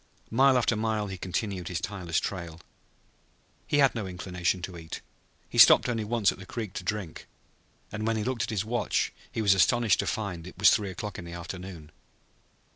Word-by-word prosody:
Mile 130 +3 +5
after 120 -1 +2
mile 110 -1 -1
he 95 -2 -6
continued 95 -1 -3
his 90 -2 -2
tireless 90 -4 -2
trail. 85 -4 -5 1.1
He - - +1
had 140 -2 +5
no 110 -5 -4
inclination 90 -1 -2
to 90 0 -5
eat. 80 -1 -7 0.5
He - - -2
stopped - - +8
only 115 -3 -1
once 105 -1 +2
at - - -11
the 95 - -9
creek 110 -5 -5
to - - -5
drink. 105 -7 -4 0.6
And 110 +1 -3
when 115 0 +1
he 105 - -1
looked 125 0 -2
at - - -1
his 105 -2 -1
watch 120 +2 0 0.2
he 110 - -2
was 100 -2 +6
astonished 110 +2 +3
to - - -1
find 95 -6 -3
that 90 - -8
it - - -16
was 100 - +7
three 105 -2 +1
o'clock 100 +2 -6
in 90 - -8
the 85 - -8
afternoon. 85 -2 -8
100 Hz, 200 wpm, -28 LUFS, 90-110 Hz, 1.1 s, stopped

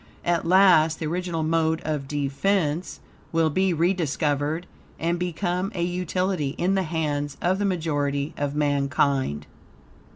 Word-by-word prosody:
At 170 -1 +1
last, 175 -4 +5
the 160 - -4
original 170 0 -2
mode 160 0 +1
of 150 -3 -2
defense 150 +4 -1 0.3
will 165 -1 +2
be 190 +4 +2
rediscovered 160 -2 0 0.3
and 170 +1 -1
become 180 +2 -2
a 170 - -1
utility 180 -3 -1
in 185 +2 +1
the 195 - +2
hands 150 -4 -2
of 185 +2 +1
the 205 - +1
majority 145 -5 -1
of 145 0 -2
mankind. 140 - +1
160 Hz, 130 wpm, -25 LUFS, 145-180 Hz, 0.3 s, last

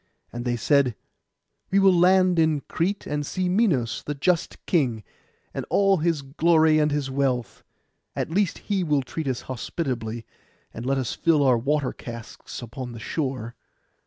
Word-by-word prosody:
And 120 +1 -5
they 120 -1 0
said, 130 0 +2 0.7
'We 195 - +2
will 195 -1 +6
land 180 0 +4
in 160 -3 +2
Crete, 195 +8 -2
and 150 0 -2
see 185 +5 -2
Minos 180 - +1
the 145 - -4
just 170 +4 0
king, 125 - +1 0.5
and - - -3
all 195 -1 +4
his 160 -3 0
glory 155 +2 +3
and 150 0 +3
his 145 -2 -2
wealth; 130 -3 -1 0.5
at - - -2
least 195 +1 +1
he 200 -3 0
will 150 -4 +1
treat 155 +3 -5
us 130 -1 -1
hospitably, 120 -3 -4 0.5
and 115 +3 -6
let 135 0 +1
us 130 -3 -2
fill 160 -4 +2
our 130 -2 +5
water 135 +3 0
casks 115 +1 -9
upon 120 +1 -7
the 115 - -8
shore. 130 -3 -3
145 Hz, 160 wpm, -25 LUFS, 125-170 Hz, 0.7 s, will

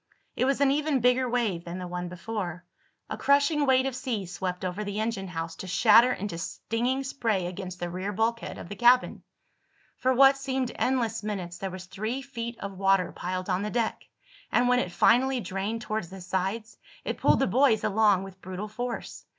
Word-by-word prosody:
It - - +1
was 275 0 +1
an 275 -1 +5
even 295 -1 +1
bigger 250 +1 +3
wave 225 -8 0
than 175 +1 -6
the 180 -1 -5
one 180 0 -4
before. 180 -2 -5 0.4
A - - -4
crushing 285 +1 +3
weight 260 0 +4
of 270 -2 -2
sea 250 -7 -3
swept 180 0 -4
over 185 +3 -3
the 205 0 -4
engine 220 -3 -2
house, 165 -2 -5
to 190 - -7
shatter 230 +6 +6
into 195 -7 -4
stinging 240 +8 -2
spray 225 -8 -1
against 180 0 -6
the 175 - -2
rear 185 +3 -4
bulkhead 225 +3 -1
of - - -8
the 205 - -7
cabin. 245 +3 +4 0.8
For 260 - +1
what 270 +2 +6
seemed 265 -2 -2
endless 230 -4 0
minutes 185 -5 -5
there 195 - -3
was 185 0 -8
three 220 +8 -4
feet 235 -3 -6
of 195 -1 -6
water 195 -2 +3
piled 185 +1 -4
on 185 -1 0
the 210 - -2
deck, 230 0 -2 0.4
and 245 - +3
when 250 0 +4
it 180 - -2
finally 250 +8 +3
drained 210 +2 -3
toward 215 -3 -2
the 190 +3 -10
sides 190 +5 -3 0.3
it - - -3
pulled - - +4
the 270 - +3
boys 235 +1 +3
along 205 -2 +3
with 190 -1 -11
brutal 185 +3 -5
force. 245 +2 -5
215 Hz, 195 wpm, -27 LUFS, 185-250 Hz, 0.8 s, shatter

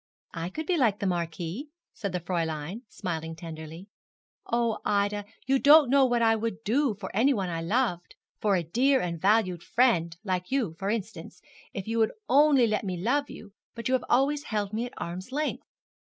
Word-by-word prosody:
'I 165 +1 -4
could 315 +11 -5
be 355 +2 +1
like 230 -8 +3
the 200 - -3
marquis,' 175 - -3 0.2
said 200 -3 -4
the 180 - -2
Fräulein, 165 +2 -3
smiling 165 -2 -4
tenderly.' 160 +1 -9 0.6
Oh, 235 -2 0
Ida, 205 0 0 0.2
you 270 +1 +2
don't 290 -2 +7
know 275 -1 +6
what 240 -2 +1
I 225 0 +4
would 225 -1 -4
do 245 +2 +1
for 190 -1 -8
anyone 220 -5 +2
I 165 -1 -3
loved 180 -1 -1 0.2
for 205 -2 +2
a 175 - 0
dear 260 - +2
and 170 -2 -3
valued 190 -4 +2
friend, 175 -8 +2
like 185 -3 -2
you 250 -11 0
for 195 0 -2
instance, 220 0 -5 0.3
if 195 0 -6
you 230 +1 -1
would 220 - +2
only 280 -2 +5
let 215 -1 0
me 185 -3 -3
love 275 +10 0
you; 205 -3 -11 0.2
but 230 +1 -4
you 260 - 0
have 260 - +1
always 285 +3 +2
held 210 -2 -2
me 230 +3 -1
at 245 - -13
arm's 185 +7 -6
length.' 300 +3 -2
210 Hz, 190 wpm, -27 LUFS, 175-250 Hz, 0.6 s, don't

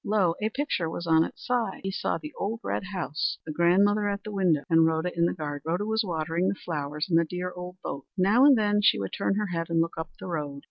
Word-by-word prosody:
Lo! 200 -5 +2
a 215 - +1
picture 225 - -1
was 170 - -5
on 160 -1 +5
its - - -8
side. 240 -6 -1
He 195 - -2
saw - - -1
the 300 -1 -9
old 220 +3 -3
red - - -2
house, 180 -6 -2
the 155 - -4
grandmother 200 +6 +3
at 200 0 -3
the 215 - -6
window, 180 -7 +2
and 165 -2 +5
Rhoda 160 +2 0
in 170 0 +3
the - - -1
garden. 145 -4 -5
Rhoda 175 +6 -1
was 220 +1 +1
watering 165 0 -1
the 195 - 0
flowers 150 -3 -3
in 165 -3 +3
the 170 - +4
dear 180 +2 -4
old 180 0 -7
boat. 140 -1 -5
Now 200 +7 +4
and 280 -3 +7
then 210 -1 +2
she - - +5
would 100 -1 -4
turn 195 - 0
her 210 -1 -1
head 165 0 -2
and 165 0 +1
look 165 0 -1
up 160 0 -4
the - - -8
road. 150 -5 -4
180 Hz, 260 wpm, -27 LUFS, 160-205 Hz, -, and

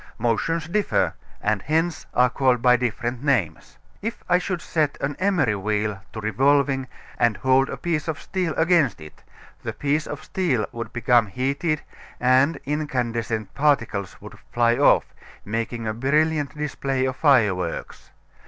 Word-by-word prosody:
Motions 160 +8 0
differ, 205 +3 +1 0.3
and 105 -2 +1
hence 160 - -1
are 125 0 +4
called 125 -1 +2
by 125 +1 +5
different 120 +1 -2
names. 105 - -1 0.2
If 225 +3 -5
I 180 - +4
should 180 -1 -3
set 155 -3 -1
an 140 +1 -2
emery 175 - +2
wheel 105 0 -2
to 110 - -5
revolving 135 +5 +2 0.3
and 120 -2 +2
hold 130 +1 +3
a - - -5
piece 160 -3 -2
of 155 -3 -3
steel 180 -4 -2
against 160 - +3
it 75 -1 -13 0.4
the - - -4
piece 145 +2 -1
of 145 - -6
steel 145 - 0
would 115 0 -6
become 120 -2 +3
heated 140 - -1 0.4
and 130 +5 +3
incandescent 120 -7 -2
particles 120 -9 0
would - - -12
fly 120 0 +3
off, 140 +3 +4 0.4
making 115 +2 -3
a 110 - -1
brilliant 150 +4 +1
display 135 -3 -1
of 130 -1 -2
fireworks. 105 - +1
130 Hz, 145 wpm, -23 LUFS, 115-150 Hz, 0.4 s, by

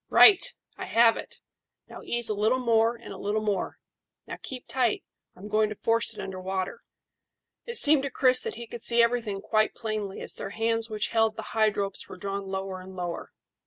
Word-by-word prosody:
Right! 405 -3 +8 0.4
I - - -4
have 230 0 +4
it; - - -9 0.5
now - - -11
ease 240 -1 0
a 215 - +1
little 215 +5 +1
more 230 -2 +2
and 235 - -10
a - - -10
little 210 +2 -1
more. 210 -3 -2 0.5
Now - - -7
keep 255 -2 -7
tight; 250 -4 0 0.3
I'm 195 +3 -10
going 215 0 +2
to 210 - -6
force 230 +2 +1
it - - -10
under 185 -1 -6
water." 190 0 -3 0.9
It 470 - -4
seemed 295 -2 +6
to 275 - -3
Chris 255 0 +4
that - - -2
he 235 +1 -7
could 235 0 -9
see 235 0 +5
everything 230 -4 -1
quite 215 +1 +1
plainly 215 -3 -4
as - - -1
their - - -6
hands 225 0 0
which 215 -1 -2
held 225 -1 +2
the - - -6
hide 215 -2 +2
ropes 200 -1 -3
were - - -9
drawn 195 +1 -4
lower 190 -1 -4
and 190 +1 -11
lower. 175 -2 -5
220 Hz, 205 wpm, -27 LUFS, 200-235 Hz, 0.9 s, Right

